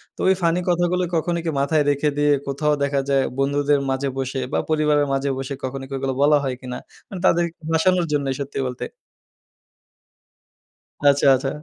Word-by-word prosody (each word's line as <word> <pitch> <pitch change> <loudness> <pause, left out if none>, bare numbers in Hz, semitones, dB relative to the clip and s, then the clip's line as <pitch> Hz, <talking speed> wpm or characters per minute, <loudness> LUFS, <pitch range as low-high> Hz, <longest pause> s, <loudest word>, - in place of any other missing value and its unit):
তো - - -27
ওই 190 - +6
ফানি 170 +1 +2
কথাগুলো 175 +1 +1
কখনো 170 +1 0
কি - - 0
মাথায় 150 +2 +2
রেখে 145 +1 +1
দিয়ে, 145 0 +3 0.2
কোথাও 150 +2 0
দেখা 140 0 +1
যায় 135 -1 +3 0.2
বন্ধুদের 140 +1 +2
মাঝে 135 +1 -1
বসে 135 0 -2
বা - - +2
পরিবারের 150 -2 +2
মাঝে 135 +1 0
বসে, 135 +1 -4
কখনো 135 +1 -4
কি 135 - -9
ওগুলো 135 0 -2
বলা 150 +1 +5
হয় 130 -2 -2
কিনা 125 -1 -6 0.3
মানে 190 - -6
তাদেরকে 170 -1 +2 0.2
হাঁসানোর 180 +2 +3
জন্যই, 140 -2 0
সত্যি 140 0 -4
বলতে। 125 -1 -5 2.2
আচ্ছা, 140 0 +4
আচ্ছা। 135 +1 -2
145 Hz, 170 wpm, -22 LUFS, 135-160 Hz, 2.2 s, ওই